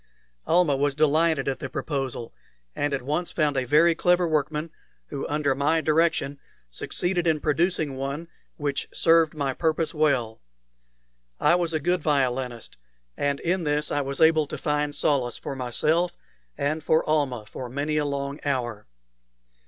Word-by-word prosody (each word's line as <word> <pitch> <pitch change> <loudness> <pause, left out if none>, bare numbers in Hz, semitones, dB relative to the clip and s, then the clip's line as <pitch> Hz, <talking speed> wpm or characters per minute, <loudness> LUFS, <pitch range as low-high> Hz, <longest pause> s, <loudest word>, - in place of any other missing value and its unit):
Almah 165 -4 +3
was 140 0 0
delighted 155 -1 +2
at 135 - -1
the - - -5
proposal, 135 -6 -4 0.4
and 145 0 -1
at 135 -2 -2
once 150 +6 -2
found 150 -3 +1
a 130 -1 0
very 155 +6 +5
clever 175 +1 +2
workman, 155 +1 -1 0.4
who 135 - -4
under 145 -2 +1
my 145 +4 +2
direction 155 -3 +1 0.3
succeeded 175 - -1
in 160 -2 +2
producing 155 -1 0
one 140 +5 -4 0.3
which 145 -2 -2
served 165 -1 +3
my 140 -3 -1
purpose 160 +1 0
well. 135 -8 +1 1.0
I - - +4
was 175 -2 +1
a 160 - 0
good 175 +3 0
violinist, 130 - -1 0.4
and 140 -1 -1
in 175 +1 0
this 150 0 0
I 145 - +1
was 135 0 -3
able 160 -2 +5
to - - -6
find 150 0 -1
solace 130 -5 +1
for 135 - -6
myself 155 +7 0 0.4
and 155 +2 -1
for 160 0 +2
Almah 140 -8 0
for 125 +3 -7
many 145 +4 -1
a 150 - +1
long 140 0 -3
hour. 120 - -2
150 Hz, 155 wpm, -25 LUFS, 140-160 Hz, 1.0 s, very